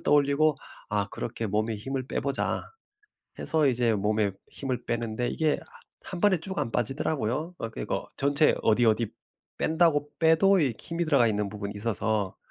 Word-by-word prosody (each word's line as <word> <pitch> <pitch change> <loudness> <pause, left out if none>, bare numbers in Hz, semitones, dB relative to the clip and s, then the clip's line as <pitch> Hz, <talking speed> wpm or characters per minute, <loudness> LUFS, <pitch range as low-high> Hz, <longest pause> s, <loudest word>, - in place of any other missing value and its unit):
떠올리고 145 +1 +3 0.3
'아 105 -1 0
그렇게 115 -1 -4
몸에 110 +2 0
힘을 130 +4 -4
빼 - - -2
보자.' 140 -1 -1 0.8
해서 155 -2 +2
이제 120 -3 +2
몸에 105 0 +1 0.2
힘을 130 -3 -4
빼는데 120 0 -2
이게 155 -2 +1
하 - - -10 0.2
한 185 - -7
번에 205 -3 +4
쭉 190 +3 -5
안 115 - -1
빠지더라고요. 135 +5 -1
어 115 - -3
그리고 - - -4
전체 140 +2 +3
어디 115 +2 +4
어디 110 0 +2 0.5
뺀다고 160 -3 +2
빼도 165 +4 +5
이 135 -5 +2
힘이 170 +1 -2
들어가 140 -7 +4
있는 105 -2 0
부분이 100 0 -5
있어서 105 -2 -1
125 Hz, 330 characters per minute, -27 LUFS, 110-155 Hz, 0.8 s, 빼도